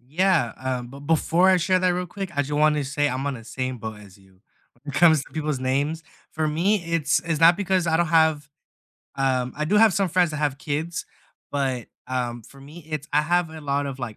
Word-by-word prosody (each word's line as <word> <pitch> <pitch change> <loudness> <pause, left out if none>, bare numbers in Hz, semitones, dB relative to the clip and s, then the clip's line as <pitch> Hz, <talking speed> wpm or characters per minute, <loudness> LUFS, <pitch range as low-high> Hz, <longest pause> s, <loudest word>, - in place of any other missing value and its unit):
Yeah, 160 0 +1
um, 125 -2 -3
but 140 +2 -11
before 165 +4 +2
I 185 - +5
share 185 +1 +2
that 185 0 +2
real 180 0 -1
quick, 195 +1 -6
I, 145 - +3
just, 145 +1 -7
wanted 150 0 +3
to 135 - -6
say 145 +1 +1
I'm 135 +1 -3
on 140 - -1
the 115 -3 -10
same 130 +2 -4
boat 110 -1 -7
as 100 -2 -16
you 95 -1 -24 0.4
when 145 -1 -7
it - - 0
comes 160 -4 +5
to - - -19
people's 155 -3 -2
names. 140 +5 -1 0.3
For 155 0 -1
me, 175 +5 +1
it's 165 -3 +1
it's 165 -3 -1
not 165 +1 +7
because 190 -3 0
I 160 -1 +2
don't 170 +1 +2
have, 160 -3 +3 0.7
um, 130 -2 0
I 150 - -1
do 200 +7 +1
have 220 -1 +6
some 195 0 +1
friends 175 0 +2
that 150 - -5
have 145 -2 -1
kids, 160 +4 -3 0.5
but, 135 -4 -2 0.2
um, 120 -2 -3
for 135 +5 -16
me, 155 +3 -13
it's 155 0 -5
I 150 +1 +3
have 175 +1 +1
a 160 0 -9
lot 140 0 -1
of, 135 -1 -6
like, 120 -4 -6
150 Hz, 235 wpm, -24 LUFS, 135-170 Hz, 0.7 s, not